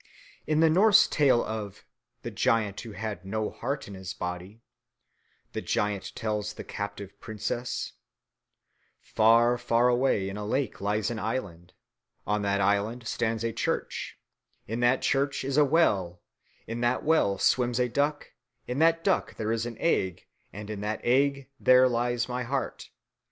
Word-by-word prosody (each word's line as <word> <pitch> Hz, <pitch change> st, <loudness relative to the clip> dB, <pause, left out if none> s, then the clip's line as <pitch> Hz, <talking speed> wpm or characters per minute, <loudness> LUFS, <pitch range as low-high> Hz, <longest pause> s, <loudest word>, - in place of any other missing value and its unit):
In 155 Hz, 0 st, +2 dB
the 165 Hz, -, +6 dB
Norse 200 Hz, +5 st, +6 dB
tale 135 Hz, -5 st, +3 dB
of 105 Hz, -3 st, -6 dB, 0.4 s
"the -, -, -5 dB
giant 105 Hz, -3 st, +1 dB
who 115 Hz, -3 st, -9 dB
had 100 Hz, -2 st, -5 dB
no 105 Hz, +3 st, -2 dB
heart 135 Hz, +3 st, -4 dB
in 100 Hz, -, -9 dB
his 95 Hz, -1 st, -7 dB
body," 90 Hz, +5 st, -6 dB, 0.9 s
the -, -, -3 dB
giant 105 Hz, -2 st, -2 dB
tells 105 Hz, -1 st, -2 dB
the -, -, -8 dB
captive 100 Hz, -1 st, -7 dB
princess, 115 Hz, +3 st, -4 dB, 1.1 s
"Far, 115 Hz, +2 st, +3 dB
far 120 Hz, 0 st, +2 dB
away 120 Hz, -6 st, +2 dB
in 100 Hz, +1 st, -5 dB
a 105 Hz, -, -4 dB
lake 130 Hz, +1 st, -2 dB
lies 105 Hz, +2 st, 0 dB
an 115 Hz, -, -4 dB
island, 95 Hz, -6 st, -4 dB, 0.5 s
on 105 Hz, 0 st, 0 dB
that 100 Hz, 0 st, 0 dB
island 100 Hz, +5 st, 0 dB
stands 115 Hz, -1 st, -1 dB
a 115 Hz, -1 st, -1 dB
church, -, -, -3 dB, 0.5 s
in 115 Hz, +2 st, -3 dB
that 120 Hz, +2 st, +2 dB
church 140 Hz, 0 st, +1 dB
is 135 Hz, 0 st, -2 dB
a 150 Hz, -, +6 dB
well, 100 Hz, -, +2 dB, 0.5 s
in 115 Hz, +1 st, -5 dB
that 120 Hz, +1 st, +1 dB
well 150 Hz, -11 st, +2 dB
swims 125 Hz, +3 st, +2 dB
a 125 Hz, -, +2 dB
duck, 145 Hz, +4 st, -1 dB, 0.3 s
in 125 Hz, +3 st, -3 dB
that 165 Hz, +1 st, +3 dB
duck 195 Hz, -, 0 dB
there 110 Hz, 0 st, -2 dB
is 115 Hz, +1 st, -1 dB
an 115 Hz, -2 st, -7 dB
egg, 95 Hz, -, 0 dB, 0.3 s
and 105 Hz, +1 st, -7 dB
in 105 Hz, -2 st, -5 dB
that 105 Hz, +1 st, -3 dB
egg 140 Hz, +2 st, +2 dB
there 130 Hz, 0 st, +6 dB
lies 120 Hz, 0 st, 0 dB
my 125 Hz, 0 st, -3 dB
heart." 130 Hz, +2 st, -3 dB
115 Hz, 160 wpm, -28 LUFS, 105-130 Hz, 1.1 s, the